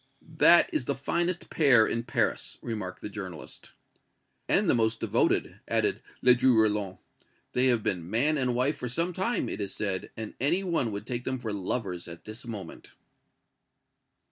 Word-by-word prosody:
"That -, -, +6 dB
is 125 Hz, -, -1 dB
the 140 Hz, -, -1 dB
finest 170 Hz, +6 st, -2 dB
pair 135 Hz, -8 st, +5 dB
in 115 Hz, -, -1 dB
Paris," 115 Hz, -, -1 dB
remarked 105 Hz, -6 st, -5 dB
the -, -, -3 dB
journalist. 95 Hz, -6 st, -9 dB, 0.8 s
"And -, -, +3 dB
the -, -, +4 dB
most 110 Hz, -1 st, +1 dB
devoted," -, -, 0 dB
added -, -, +1 dB, 0.2 s
Ledru 125 Hz, -1 st, +5 dB
Rollin. 105 Hz, -3 st, +1 dB, 0.6 s
"They 125 Hz, +1 st, +3 dB
have 120 Hz, -4 st, +2 dB
been 85 Hz, -2 st, -1 dB
man 135 Hz, +9 st, +2 dB
and 130 Hz, -4 st, 0 dB
wife 130 Hz, +5 st, +1 dB
for 125 Hz, -, -4 dB
some 170 Hz, +8 st, 0 dB
time, 190 Hz, +8 st, -1 dB
it -, -, -4 dB
is 100 Hz, -1 st, -2 dB
said, 100 Hz, -3 st, -2 dB
and 110 Hz, -1 st, -6 dB
any 170 Hz, +8 st, +2 dB
one 165 Hz, -, 0 dB
would 100 Hz, 0 st, -5 dB
take 120 Hz, -1 st, -4 dB
them 130 Hz, 0 st, -2 dB
for 115 Hz, -4 st, -4 dB
lovers 95 Hz, -2 st, -3 dB
at 85 Hz, -1 st, -11 dB
this 110 Hz, +2 st, -8 dB
moment." 100 Hz, -7 st, -8 dB
115 Hz, 170 wpm, -28 LUFS, 105-130 Hz, 0.8 s, That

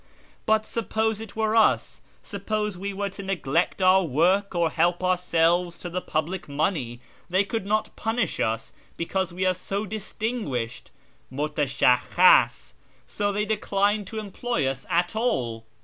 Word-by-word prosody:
But 220 Hz, 0 st, +3 dB
suppose 220 Hz, -1 st, -1 dB
it 225 Hz, -, -9 dB
were 220 Hz, 0 st, +1 dB
us, 220 Hz, -2 st, +3 dB, 0.2 s
suppose 210 Hz, 0 st, -3 dB
we 200 Hz, +3 st, -4 dB
were 200 Hz, 0 st, -3 dB
to 195 Hz, -, -8 dB
neglect 180 Hz, -2 st, 0 dB
our 185 Hz, +1 st, +6 dB
work 180 Hz, +7 st, +2 dB
or 170 Hz, -2 st, +2 dB
help 175 Hz, +2 st, +1 dB
ourselves 175 Hz, -1 st, +2 dB
to 175 Hz, -, -7 dB
the 180 Hz, +1 st, -2 dB
public 160 Hz, +2 st, -3 dB
money, 140 Hz, -5 st, -1 dB, 0.3 s
they 185 Hz, +3 st, +3 dB
could 200 Hz, -1 st, -3 dB
not 215 Hz, +1 st, 0 dB
punish 225 Hz, -4 st, -1 dB
us 115 Hz, 0 st, -1 dB, 0.2 s
because 185 Hz, +2 st, -1 dB
we 185 Hz, +2 st, -2 dB
are 185 Hz, -, +3 dB
so 195 Hz, +3 st, -3 dB
distinguished 210 Hz, -, -4 dB, 0.4 s
{mutashakhkhas). 145 Hz, +3 st, +3 dB, 0.3 s
So 205 Hz, -1 st, -1 dB
they 210 Hz, +1 st, -1 dB
decline 205 Hz, -1 st, +1 dB
to 220 Hz, +4 st, -8 dB
employ 215 Hz, -, -2 dB
us 135 Hz, 0 st, -3 dB
at 175 Hz, +4 st, +1 dB
all." 120 Hz, -, -1 dB
185 Hz, 145 wpm, -25 LUFS, 165-210 Hz, 0.4 s, our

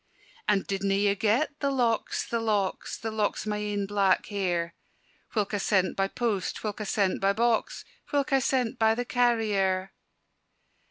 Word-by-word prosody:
"And 205 Hz, -2 st, +2 dB
didna 195 Hz, 0 st, 0 dB
ye 200 Hz, 0 st, +3 dB
get 230 Hz, +9 st, 0 dB
the 280 Hz, -, +1 dB
locks, 240 Hz, -5 st, 0 dB
the 235 Hz, -, -1 dB
locks, 210 Hz, -4 st, -1 dB
The 225 Hz, -1 st, -4 dB
locks 215 Hz, -1 st, -1 dB
o' 215 Hz, -, -2 dB
my 210 Hz, -, -1 dB
ain 205 Hz, -1 st, -2 dB
black 195 Hz, -2 st, +2 dB
hair, 175 Hz, -4 st, -1 dB, 0.6 s
Whilk 210 Hz, -1 st, 0 dB
I 205 Hz, -, 0 dB
sent 190 Hz, -1 st, +1 dB
by 195 Hz, 0 st, +1 dB
post, 215 Hz, -3 st, -2 dB
whilk 215 Hz, 0 st, -3 dB
I -, -, -3 dB
sent 195 Hz, -1 st, 0 dB
by 195 Hz, +1 st, +3 dB
box, 235 Hz, -, 0 dB, 0.3 s
Whilk 280 Hz, -1 st, 0 dB
I 270 Hz, -, +5 dB
sent 255 Hz, -2 st, 0 dB
by 220 Hz, 0 st, +4 dB
the 245 Hz, +1 st, -2 dB
carrier?" 210 Hz, -7 st, +1 dB
210 Hz, 170 wpm, -27 LUFS, 195-230 Hz, 0.6 s, I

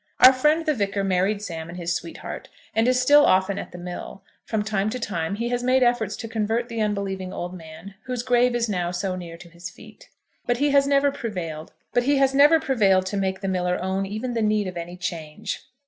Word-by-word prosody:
Our 255 Hz, +1 st, +9 dB
friend 300 Hz, +5 st, +2 dB
the 305 Hz, -, +2 dB
Vicar 200 Hz, -4 st, -1 dB
married 195 Hz, +2 st, +1 dB
Sam 165 Hz, -4 st, -6 dB
and 175 Hz, -, -8 dB
his 170 Hz, -1 st, -2 dB
sweetheart, 325 Hz, -, -6 dB, 0.2 s
and 225 Hz, +2 st, +2 dB
is 255 Hz, 0 st, +3 dB
still 290 Hz, +3 st, +6 dB
often 190 Hz, -2 st, +3 dB
at -, -, -7 dB
the -, -, -9 dB
mill. 180 Hz, +2 st, -7 dB, 0.2 s
From 220 Hz, -2 st, -1 dB
time 210 Hz, -1 st, 0 dB
to 250 Hz, +3 st, -4 dB
time 175 Hz, -5 st, -2 dB
he 235 Hz, +3 st, -2 dB
has 245 Hz, 0 st, -1 dB
made 255 Hz, +1 st, +3 dB
efforts 235 Hz, -4 st, +1 dB
to 225 Hz, -, -6 dB
convert 225 Hz, +2 st, -1 dB
the 230 Hz, -1 st, -3 dB
unbelieving 195 Hz, -3 st, -2 dB
old 175 Hz, +1 st, -5 dB
man 165 Hz, +2 st, -10 dB
whose 250 Hz, -2 st, -3 dB
grave 245 Hz, -1 st, +3 dB
is 235 Hz, -1 st, +1 dB
now 180 Hz, -4 st, -1 dB
so 185 Hz, +1 st, -2 dB
near 170 Hz, -2 st, -8 dB
to 175 Hz, 0 st, -13 dB
his 170 Hz, +1 st, -9 dB
feet; -, -, -16 dB, 0.4 s
but 245 Hz, 0 st, +2 dB
he 290 Hz, +2 st, +2 dB
has 280 Hz, 0 st, +4 dB
never 280 Hz, 0 st, +3 dB
prevailed 180 Hz, -, -5 dB, 0.2 s
to 270 Hz, -, +3 dB
make 190 Hz, 0 st, -1 dB
the 195 Hz, -, -3 dB
miller 180 Hz, -1 st, 0 dB
own 190 Hz, +1 st, -1 dB
even 220 Hz, +5 st, -4 dB
the 230 Hz, -, -1 dB
need 215 Hz, -1 st, +2 dB
of 185 Hz, -1 st, -5 dB
any 175 Hz, +1 st, -6 dB
change. 165 Hz, -4 st, -5 dB
205 Hz, 210 wpm, -24 LUFS, 180-245 Hz, 0.4 s, Our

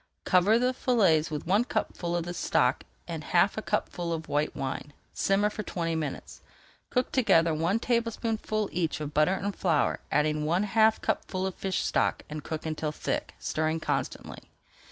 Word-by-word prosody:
Cover 190 Hz, +5 st, +4 dB
the 250 Hz, +2 st, +2 dB
fillets 195 Hz, -12 st, +3 dB
with 150 Hz, -2 st, -4 dB
one 200 Hz, +6 st, +3 dB
cupful 175 Hz, -7 st, -2 dB
of 170 Hz, -, 0 dB
this 175 Hz, 0 st, -5 dB
stock -, -, +1 dB, 0.2 s
and -, -, -5 dB
half -, -, +3 dB
a -, -, -3 dB
cupful 170 Hz, -1 st, -2 dB
of 160 Hz, -1 st, -3 dB
white 150 Hz, +1 st, 0 dB
wine. 135 Hz, +2 st, -4 dB, 0.2 s
Simmer 205 Hz, +2 st, +2 dB
for 215 Hz, -, -4 dB
twenty 170 Hz, -4 st, -2 dB
minutes. 155 Hz, -3 st, -4 dB, 0.5 s
Cook 250 Hz, -1 st, 0 dB
together 180 Hz, -10 st, +4 dB
one 165 Hz, +7 st, +1 dB
tablespoonful 230 Hz, -2 st, -1 dB
each 165 Hz, -3 st, -1 dB
of 150 Hz, -1 st, -5 dB
butter 155 Hz, +5 st, +3 dB
and 200 Hz, +1 st, -3 dB
flour, 160 Hz, -6 st, +1 dB
add 150 Hz, +1 st, +2 dB
one 160 Hz, +6 st, +1 dB
half 220 Hz, +1 st, +3 dB
cupful 185 Hz, 0 st, -1 dB
of 190 Hz, -, -2 dB
fish 190 Hz, 0 st, -2 dB
stock -, -, +1 dB
and 150 Hz, -1 st, -5 dB
cook 160 Hz, -1 st, -5 dB
until 155 Hz, -1 st, -2 dB
thick, -, -, -3 dB
stirring 155 Hz, +1 st, -1 dB
constantly. -, -, -3 dB
175 Hz, 170 wpm, -28 LUFS, 155-210 Hz, 0.5 s, Cover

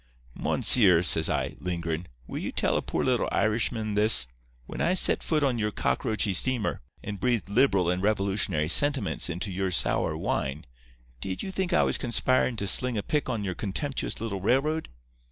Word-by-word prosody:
"'Monseer,' 95 Hz, -8 st, +6 dB
says 80 Hz, -1 st, +6 dB
I, -, -, -2 dB
lingerin', 85 Hz, -1 st, -4 dB, 0.2 s
'will -, -, -6 dB
you -, -, -5 dB
tell -, -, 0 dB
a -, -, 0 dB
poor -, -, -3 dB
little 125 Hz, -2 st, 0 dB
Irishman 110 Hz, -1 st, -1 dB
this: 105 Hz, -, +4 dB, 0.4 s
When -, -, -7 dB
I 175 Hz, +2 st, +1 dB
set -, -, +4 dB
foot 155 Hz, -2 st, -1 dB
on 130 Hz, -4 st, 0 dB
your 105 Hz, -1 st, -1 dB
cockroachy 100 Hz, +5 st, -2 dB
steamer, 120 Hz, +4 st, -1 dB, 0.2 s
and 100 Hz, -1 st, -6 dB
breathed 115 Hz, -1 st, -1 dB
liberal 100 Hz, -5 st, +2 dB
and 90 Hz, +1 st, -1 dB
revolutionary 100 Hz, -6 st, -1 dB
sentiments 135 Hz, -, 0 dB
into 90 Hz, +4 st, -4 dB
your 95 Hz, +1 st, -2 dB
sour 90 Hz, -, 0 dB
wine, 70 Hz, +3 st, -3 dB, 0.5 s
did 95 Hz, +8 st, -5 dB
you 190 Hz, -, -5 dB
think 190 Hz, -1 st, -3 dB
I 180 Hz, -, +3 dB
was -, -, 0 dB
conspirin' 130 Hz, 0 st, 0 dB
to 100 Hz, -, -3 dB
sling 125 Hz, +5 st, +2 dB
a 100 Hz, -, -3 dB
pick 150 Hz, -3 st, -2 dB
on 115 Hz, -5 st, -3 dB
your 95 Hz, -2 st, -3 dB
contemptuous 120 Hz, +10 st, -4 dB
little 100 Hz, -4 st, -5 dB
railroad? 145 Hz, +9 st, 0 dB
105 Hz, 175 wpm, -26 LUFS, 95-125 Hz, 0.5 s, Monseer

